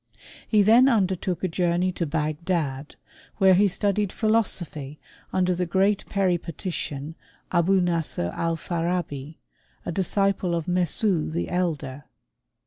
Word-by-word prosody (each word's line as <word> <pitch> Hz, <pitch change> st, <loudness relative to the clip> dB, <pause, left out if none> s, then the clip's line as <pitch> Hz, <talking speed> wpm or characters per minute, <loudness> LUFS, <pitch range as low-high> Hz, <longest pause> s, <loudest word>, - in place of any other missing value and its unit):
He 210 Hz, -2 st, +4 dB
then 235 Hz, +6 st, +6 dB
undertook 190 Hz, -5 st, 0 dB
a -, -, +2 dB
journey 175 Hz, +1 st, +1 dB
to 170 Hz, -2 st, -3 dB
Bagdad, 150 Hz, -2 st, -2 dB, 0.4 s
where 190 Hz, -2 st, +6 dB
he 200 Hz, +3 st, +5 dB
studied 200 Hz, +1 st, 0 dB
philosophy 175 Hz, -10 st, -1 dB, 0.3 s
under 185 Hz, -1 st, +2 dB
the 180 Hz, 0 st, -2 dB
great 195 Hz, +3 st, +1 dB
Peripatician, 170 Hz, -5 st, -2 dB, 0.4 s
Abou 185 Hz, +3 st, +3 dB
Nasr 165 Hz, -, -1 dB
Alfarabi, 165 Hz, -3 st, -2 dB, 0.5 s
a -, -, -2 dB
disciple 190 Hz, 0 st, 0 dB
of 165 Hz, -2 st, -3 dB
Mesne 180 Hz, 0 st, +1 dB
the 165 Hz, +2 st, -3 dB
elder. 150 Hz, -6 st, -2 dB
175 Hz, 115 wpm, -25 LUFS, 160-190 Hz, 0.5 s, then